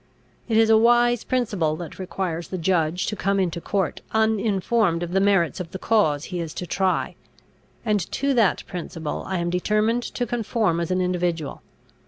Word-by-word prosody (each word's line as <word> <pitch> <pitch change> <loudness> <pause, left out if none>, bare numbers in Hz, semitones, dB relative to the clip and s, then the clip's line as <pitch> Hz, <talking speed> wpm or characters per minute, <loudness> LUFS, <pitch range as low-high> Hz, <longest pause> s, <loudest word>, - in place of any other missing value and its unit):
It 220 - +2
is 225 0 +5
a 220 - +7
wise 240 0 +4
principle 205 -11 0
that 165 +1 -8
requires 180 -3 -3
the 185 - -4
judge 170 -1 +1
to 210 - -2
come 200 0 0
into 170 -2 -1
court 195 -2 -1
uninformed 220 -4 +1
of 175 - -5
the 190 - +2
merits 195 -4 +2
of 180 -2 -5
the 190 - -6
cause 175 -10 +2
he 180 0 -5
is 165 -2 -5
to 180 - -4
try; 190 +1 0 0.7
and 210 -2 +2
to 280 0 0
that 225 -6 +2
principle 165 -4 -5
I 190 - -1
am 170 0 -1
determined 215 +6 +1
to 245 0 -3
conform 225 -6 0
as 170 - -2
an 185 0 +1
individual. 175 -4 -1
190 Hz, 180 wpm, -24 LUFS, 170-220 Hz, 0.7 s, a